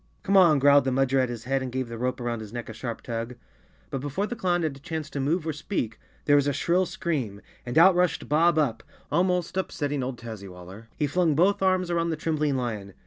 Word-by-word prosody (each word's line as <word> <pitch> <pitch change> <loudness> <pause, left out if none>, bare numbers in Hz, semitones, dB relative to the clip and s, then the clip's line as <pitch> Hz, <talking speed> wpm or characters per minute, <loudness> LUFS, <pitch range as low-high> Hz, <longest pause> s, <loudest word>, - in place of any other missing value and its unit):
" - - -38
Come 195 - +1
on," 175 -6 +7
growled 140 0 +5
the - - +2
Mudger 135 +1 +2
at 130 - 0
his 120 -2 -6
head 135 +2 0
and 130 -1 -4
gave 130 0 -2
the 115 - -7
rope 125 +1 -1
around 120 -1 -2
his 110 -2 -9
neck 120 -1 -6
a - - -6
sharp 115 +1 -6
tug. 115 +1 -4 0.6
But 135 - -3
before 145 +8 -2
the 240 - -5
clown 175 -5 0
had 155 -4 -1
a - - -13
chance 160 -1 -5
to 140 - -4
move 155 +5 0
or 160 - -1
speak, 145 - -3 0.3
there 145 - +5
was 145 -1 +3
a 145 - +1
shrill 175 +6 +1
scream, 135 - -3 0.3
and 120 - -2
out 185 +4 +8
rushed 180 0 0
Bob 165 +2 +3
Up, 125 -8 +1 0.3
almost 180 +2 +1
upsetting 145 -6 -2
old 125 -1 -4
Tazzy 110 -4 -8
waller. 95 +5 -12
He 150 - 0
flung 160 +1 +1
both 190 +6 +3
arms 185 -2 +2
around 170 0 0
the 160 - -1
trembling 150 -2 0
lion. 105 -6 -4
145 Hz, 245 wpm, -26 LUFS, 120-170 Hz, 0.6 s, out